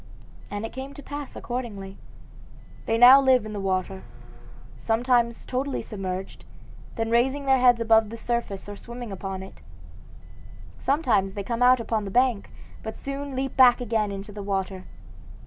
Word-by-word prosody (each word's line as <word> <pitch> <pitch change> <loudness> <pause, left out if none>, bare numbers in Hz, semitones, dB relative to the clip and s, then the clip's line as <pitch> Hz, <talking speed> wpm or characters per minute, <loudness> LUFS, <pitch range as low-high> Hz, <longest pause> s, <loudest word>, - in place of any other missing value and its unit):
And 205 +1 -4
it - - -8
came 265 +2 -7
to 285 - -10
pass 290 -1 -7
accordingly. 210 -6 -5 0.9
They 225 - +2
now 255 +3 +9
live 260 -4 +4
in 215 - -6
the 205 - -4
water, 190 0 -2 0.7
sometimes 235 0 +1
totally 265 +2 -2
submerged, 190 -2 -6 0.5
then 225 0 -2
raising 265 +4 +1
their 265 -1 +4
heads 245 -2 +5
above 225 -1 +4
the 230 - -7
surface 235 -5 -3
or 205 - -7
swimming 240 +1 -8
upon 190 0 -5
it. 190 - -13 1.2
Sometimes 240 -10 +1
they 200 - -4
come 235 +3 -3
out 250 0 +6
upon 225 -2 -2
the - - -4
bank, 245 -1 +1 0.3
but 220 0 -7
soon 275 0 -5
leap 265 +1 -3
back 255 -2 +6
again 220 -4 -1
into 200 +2 -7
the 205 0 -7
water. 195 -1 -3
230 Hz, 160 wpm, -25 LUFS, 200-255 Hz, 1.2 s, now